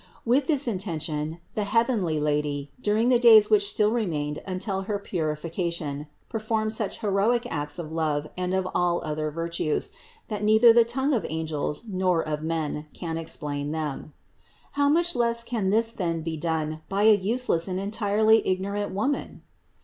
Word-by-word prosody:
With 260 +4 +2
this 290 -4 +2
intention 160 -6 -2 0.2
the 210 - -1
heavenly 210 -7 +1
Lady, 145 -1 -1
during 220 +3 +2
the 245 -2 +4
days 220 -3 +7
which 205 -1 +4
still 210 0 +2
remained 155 -10 -2
until 190 +1 -2
her 205 - 0
purification, 160 -4 -3 0.2
performed 220 -1 -1
such 220 -1 -2
heroic 215 +4 +1
acts 145 0 -2
of 165 -3 -6
love 155 -2 -1
and 180 0 -2
of 190 -1 0
all 175 -1 +1
other 155 0 -2
virtues, 165 0 -2 0.4
that 210 -1 -4
neither 220 +2 +6
the 235 0 +6
tongue 265 +5 0
of 225 -8 +1
angels 155 -1 -3
nor 185 -5 0
of 150 -1 -2
men 155 -2 -3
can 165 -2 -4
explain 150 -2 -3
them. 155 -1 -4 0.6
How 285 0 +2
much 345 +3 +2
less 235 -1 +1
can 225 -5 -1
this 225 +3 +2
then 170 -7 -2
be 165 0 -3
done 155 -1 -2
by 200 +1 0
a 220 0 +8
useless 205 -3 +1
and 185 0 -2
entirely 215 +2 +3
ignorant 200 +2 -2
woman? 270 +8 -2
190 Hz, 160 wpm, -26 LUFS, 155-220 Hz, 0.6 s, a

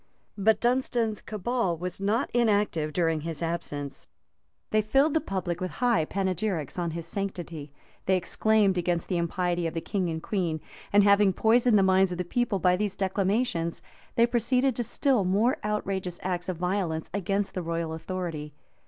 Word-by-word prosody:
But 210 +1 +3
Dunstan's 240 -3 0
cabal 215 -3 -1
was 180 +3 -5
not 215 +6 0
inactive 205 -9 +2
during 165 -1 +1
his 165 +1 -4
absence: 145 -5 -4 0.6
they 215 - +4
filled 270 +8 +3
the 320 - +2
public 185 -3 -3
with 185 - -3
high 235 -10 +2
panegyrics 185 -3 -2
on 170 -1 -1
his 165 0 -5
sanctity: 170 -7 -5 0.4
they 190 0 +4
exclaimed 200 +1 +2
against 175 -1 -1
the 180 - +1
impiety 175 0 0
of 165 - -6
the - - 0
king 180 +2 -2
and 160 0 -4
queen; 175 -6 -1 0.3
and 205 0 +6
having 200 -1 +5
poisoned 230 +2 +4
the 195 - +4
minds 190 0 +4
of 180 - -3
the 180 - -2
people 240 +2 0
by 180 -1 +3
these 200 +1 -2
declamations, 190 -2 0 0.3
they 235 - +5
proceeded 250 +2 +1
to 240 - 0
still 255 -1 +1
more 205 +7 +2
outrageous 195 -4 -2
acts 180 -1 -2
of 180 - -2
violence 180 -3 -2
against 200 +1 -1
the 185 - -2
royal 165 -1 -2
authority. 160 -3 -5
190 Hz, 170 wpm, -27 LUFS, 170-215 Hz, 0.6 s, and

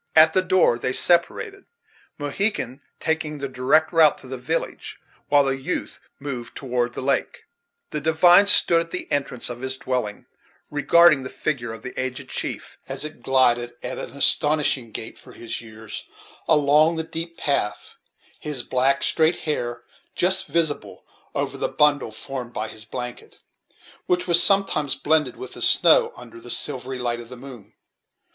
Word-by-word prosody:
At 160 0 +7
the 185 - +3
door 185 -10 +2
they 125 - -2
separated, 380 - 0 0.5
Mohegan 145 - -2 0.2
taking 160 -1 -2
the 140 -1 -4
direct 135 +6 +1
route 160 -3 +5
to - - -13
the 130 - -5
village, 135 +7 -4 0.3
while 145 0 +5
the 135 -1 0
youth 135 - -4 0.2
moved 130 -4 -6
toward 125 -2 -2
the - - -5
lake. 140 +1 -1 0.5
The 150 - -3
divine 175 +5 +5
stood 170 -4 +5
at 165 - -7
the 180 - -5
entrance 135 -4 -2
of 120 0 -7
his 130 0 -4
dwelling, 125 -7 -3 0.5
regarding 155 0 +5
the 130 - -7
figure 120 -7 -3
of 115 0 -10
the 125 - -7
aged 130 -1 -4
chief - - -5
as - - -2
it 155 -5 -9
glided, 120 -2 +2
at - - -5
an - - -6
astonishing 145 -3 +1
gait 110 +1 -7
for - - -14
his 115 0 -5
years, 110 -1 -9 0.4
along 150 +1 +4
the 160 - -2
deep 165 +1 -6
path; 140 -8 -1 0.5
his 145 -5 -4
black, 135 +2 +1
straight 160 +1 +2
hair 120 -6 -3 0.3
just 190 +1 +1
visible 160 -3 -2 0.3
over - - -2
the - - -1
bundle 145 -4 +2
formed 120 +2 -6
by 110 +1 -3
his 110 0 -8
blanket, 125 +1 -7 0.7
which 180 0 +1
was 170 -1 +5
sometimes 175 -6 +3
blended 155 0 +1
with 390 - -8
the - - -9
snow, 475 -2 +6
under 345 - -12
the - - -11
silvery 130 -2 0
light 120 -1 -2
of 120 -1 -10
the 125 - -10
moon. 120 -5 -12
140 Hz, 165 wpm, -23 LUFS, 125-160 Hz, 0.7 s, At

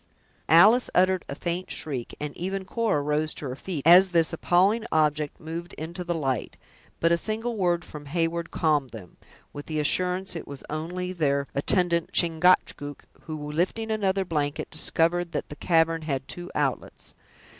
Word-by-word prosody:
Alice 210 +10 +6
uttered 185 0 +3
a 140 - -4
faint 175 +4 -3
shriek, 135 -5 -4
and 150 -1 -5
even 190 +2 -3
Cora 215 -7 0
rose 150 +1 0
to - - -7
her 130 -1 -4
feet, 150 -1 -5
as 180 +3 +8
this 165 -2 +2
appalling 190 +7 +2
object 150 -1 +1
moved 165 +2 -7
into 170 +3 -6
the 175 -1 -2
light; 135 -6 -2 0.4
but 165 - +3
a 170 - +4
single 225 +5 -2
word 175 -4 0
from 150 -1 -10
Heyward 165 +2 -1
calmed 150 -5 +1
them, 105 -7 -11 0.4
with 145 - -8
the 155 -1 -2
assurance 180 +5 0
it 165 - -6
was 140 -1 -8
only 180 +4 -4
their 140 -5 +1
attendant, 170 +3 +1
Chingachgook, 165 -4 +2 0.2
who, 150 -2 -5
lifting 190 +8 -1
another 195 -3 0
blanket, 150 -4 -2
discovered 170 +1 +1
that - - -3
the 150 - -7
cavern 165 0 +2
had 140 -4 -3
two 175 0 -6
outlets. 140 -4 -2
165 Hz, 165 wpm, -26 LUFS, 150-180 Hz, 0.4 s, as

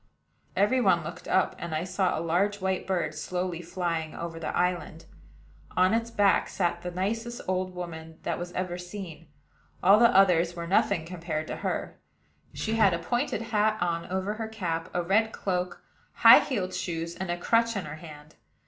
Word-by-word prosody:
Every 210 +7 +3
one - - +3
looked - - -8
up; - - +2
and 170 -2 -4
I 155 - -1
saw 185 0 0
a - - -2
large 200 +5 +1
white 190 -1 -1
bird 175 -5 -1
slowly 180 +2 -3
flying 165 -2 -3
over 165 -1 -6
the 165 - -3
island. 175 -2 -1 0.7
On 185 +2 +4
its 230 0 0
back 205 -3 +3
sat 175 -2 -1
the 180 - -4
nicest 225 +7 -3
old 185 0 -1
woman 160 -2 -7
that - - -2 0.2
ever 180 -1 -2
was 180 0 -7
seen: 175 -5 -8 0.6
all 200 +3 +7
the 235 - +7
others 175 -3 +4
were 170 -1 -5
nothing 175 -1 +2
compared 165 -3 -4
to - - -4
her. - - -3 0.5
She 220 - -3
had 200 -6 +5
a - - -1
pointed 240 - -1
hat 215 -1 +1
on 170 -1 -1
over 190 +3 -2
her 220 +1 -4
cap, 180 -6 -3
a 175 - -1
red 220 +5 +2
cloak, 180 -2 -3 0.3
high - - +9
heeled 190 -9 -2
shoes, 165 -1 -3
and 190 +1 -5
a 175 - -1
crutch 230 +5 +2
in 190 - -3
her 150 +1 -7
hand. 150 -2 -12
180 Hz, 185 wpm, -28 LUFS, 170-200 Hz, 0.7 s, high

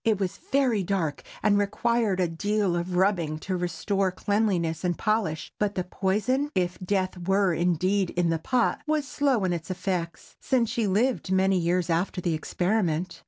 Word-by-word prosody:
It 220 -3 +2
was 195 -1 -2
very 260 -6 +3
dark, 175 -6 -1 0.2
and 205 -1 +4
required 210 0 +1
a 180 - +2
deal 200 +2 0
of 175 +1 -2
rubbing 175 -5 +1
to 190 - -2
restore 190 +2 -1
cleanliness 185 -5 0
and 175 -2 0
polish; 215 -8 -1
but 205 -1 0
the 185 - -1
poison—if 195 +1 -1
death 185 -1 -1
were, 195 -1 +3
indeed, 180 +3 +1
in 175 -1 0
the 165 - 0
pot—was 275 - 0
slow 270 -8 +1
in 180 -1 +1
its 170 +1 -5
effects, 180 -2 -4
since 245 -4 +1
she 225 -3 0
lived 215 +1 +1
many 190 0 +3
years 175 +1 +1
after 175 +3 0
the 175 -2 -1
experiment. 175 +1 -1
190 Hz, 165 wpm, -26 LUFS, 175-210 Hz, 0.2 s, and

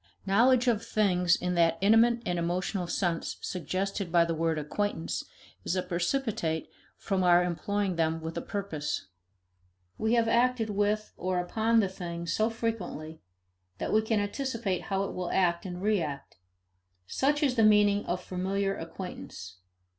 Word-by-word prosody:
Knowledge 240 +6 +4
of 230 -2 +2
things 180 -6 +2
in 180 0 -2
that 165 -1 +3
intimate 230 +4 +4
and 175 -1 -1
emotional 180 +2 -1
sense 170 -2 -1
suggested 185 +2 -3
by 170 -1 +5
the 165 - -1
word 165 0 0
acquaintance 165 +3 -2 0.4
is 175 - -1
a 185 - 0
precipitate 180 - -1 0.3
from 195 -3 -1
our 175 0 +5
employing 190 +2 -1
them 165 0 +1
with 160 0 -6
a - - -2
purpose. 160 - -4 0.9
We 220 +1 +1
have 230 -1 +3
acted 235 -1 +2
with 210 +1 0
or 185 0 -1
upon 220 +6 +2
the 200 - +1
thing 170 -2 -6
so 215 +6 +1
frequently 200 -9 -4 0.6
that - - -3
we 215 - +5
can 220 -1 0
anticipate 210 -3 -2
how 195 0 0
it 195 - -4
will 180 -1 -3
act 175 -1 +1
and 180 -1 -6
react 165 - -1 0.7
such 290 - +1
is 270 -3 +3
the 235 - +2
meaning 210 -1 +5
of 180 +1 -2
familiar 195 +2 -1
acquaintance. 165 - -8
190 Hz, 155 wpm, -29 LUFS, 170-215 Hz, 0.9 s, by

